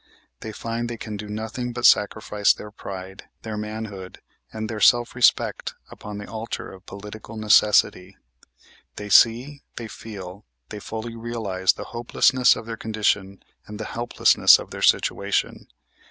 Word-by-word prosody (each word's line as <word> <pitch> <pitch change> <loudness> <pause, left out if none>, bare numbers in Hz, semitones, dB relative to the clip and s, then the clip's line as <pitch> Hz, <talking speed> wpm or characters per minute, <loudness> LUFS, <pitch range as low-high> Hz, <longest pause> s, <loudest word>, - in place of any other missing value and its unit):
They 110 - -7
find 115 +2 -4
they 120 - -5
can 110 -1 -7
do 105 0 -7
nothing 110 +3 -5
but 120 +1 -2
sacrifice 105 -1 +3
their 105 - -10
pride, 95 -2 -9 0.2
their 110 -1 -5
manhood, 105 -3 -7 0.3
and 110 0 -5
their 110 -1 -5
self 120 +3 +4
respect 125 -1 +2 0.2
upon 105 0 -9
the 105 - -7
altar 110 +1 -6
of 95 -1 -15
political 105 +2 -9
necessity. 105 -3 +3 0.8
They 105 0 -7
see, 125 +8 +4
they 115 - -6
feel, 100 -3 -9 0.3
they 105 - -7
fully 115 +2 -6
realize 110 -5 -1
the - - -8
hopelessness 125 +2 +3
of - - -8
their 115 0 -6
condition 105 -3 -1 0.2
and 105 0 -9
the 110 - -4
helplessness 120 +1 +5
of - - -10
their - - -7
situation. - - +1
110 Hz, 150 wpm, -23 LUFS, 105-115 Hz, 0.8 s, helplessness